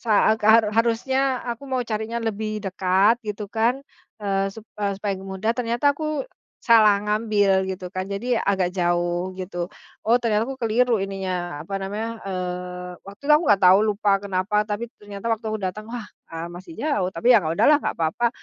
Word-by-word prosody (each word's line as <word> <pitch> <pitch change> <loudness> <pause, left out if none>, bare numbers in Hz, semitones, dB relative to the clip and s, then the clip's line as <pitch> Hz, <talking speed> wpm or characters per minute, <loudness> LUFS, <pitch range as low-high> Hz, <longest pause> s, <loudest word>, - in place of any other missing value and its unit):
saat 220 -1 +3
haru 220 0 +5
harusnya 255 +4 +1
aku 245 +3 -5
mau 255 -2 -1
carinya 220 0 -3
lebih 215 -2 -3
dekat, 190 +5 +2
gitu 210 0 -4
kan, 240 +5 +1 0.3
eee, 195 -2 -1
sup 215 +2 -11 0.2
eee, 200 -1 0
supaya 200 -1 -2
mudah, 195 +3 -2
ternyata 240 +4 +1
aku 305 - -3 0.4
salah 215 -4 +5
ngambil, 210 -3 +2
gitu 185 -1 -7
kan, 185 0 -4
jadi 200 +6 -2
agak 190 -3 +1
jauh, 175 +1 0
gitu. 185 0 -5 0.3
Oh, 230 +3 +4
ternyata 220 -2 +1
aku 265 +2 -7
keliru 230 -1 +2
ininya, 185 -5 -4
apa 195 - -6
namanya, 220 +4 -4
eee, 180 -1 -4
waktu 200 +4 -13
itu 300 - +4
aku 300 +3 +5
nggak 200 -1 +5
tahu, 185 +1 +8
lupa 205 0 +1
kenapa, 200 +1 0
tapi 210 +3 -2 0.2
ternyata 205 0 -10
waktu 225 0 -3
aku 215 - -1
datang, 210 +2 -5
wah, 240 -1 -5 0.2
eee, 165 +1 -6
masih 185 - -10
jauh, 285 -12 0
tapi 185 +8 +3
yang 200 -9 +4
udahlah 290 - +4
nggak - - -3
papa. 165 +9 +1
210 Hz, 175 wpm, -23 LUFS, 190-230 Hz, 0.4 s, tahu